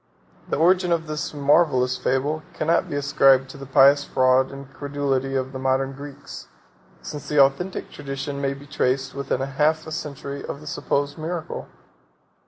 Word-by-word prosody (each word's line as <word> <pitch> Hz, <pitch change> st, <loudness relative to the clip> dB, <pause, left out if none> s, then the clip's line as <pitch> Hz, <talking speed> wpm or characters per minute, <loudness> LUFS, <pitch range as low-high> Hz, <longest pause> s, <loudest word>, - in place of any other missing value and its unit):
The -, -, 0 dB
origin 180 Hz, +3 st, +3 dB
of 165 Hz, -1 st, +1 dB
this 155 Hz, -1 st, -4 dB
marvellous 140 Hz, -3 st, +3 dB
fable 135 Hz, +4 st, -1 dB
cannot 165 Hz, +2 st, +1 dB
be -, -, -3 dB
ascribed 135 Hz, -2 st, +4 dB
to 145 Hz, -, -11 dB
the 135 Hz, -, -8 dB
pious 140 Hz, +2 st, +6 dB
fraud 130 Hz, -1 st, +2 dB
and 135 Hz, -1 st, -10 dB
credulity 140 Hz, -2 st, -2 dB
of 130 Hz, 0 st, -1 dB
the 130 Hz, -, -5 dB
modern 135 Hz, +1 st, 0 dB
Greeks, 140 Hz, +1 st, -10 dB, 0.6 s
since 150 Hz, -1 st, -7 dB
the 150 Hz, -, +2 dB
authentic 140 Hz, +8 st, +2 dB
tradition 140 Hz, 0 st, -5 dB
may 140 Hz, 0 st, -1 dB
be 140 Hz, +1 st, -12 dB
traced 135 Hz, -2 st, -1 dB
within 140 Hz, -1 st, -2 dB
half 150 Hz, +4 st, +1 dB
a 160 Hz, -, -8 dB
century 140 Hz, -3 st, -5 dB
of -, -, -6 dB
the 150 Hz, -, -13 dB
supposed 145 Hz, 0 st, -2 dB
miracle. 165 Hz, +1 st, -4 dB
140 Hz, 165 wpm, -23 LUFS, 135-150 Hz, 0.6 s, pious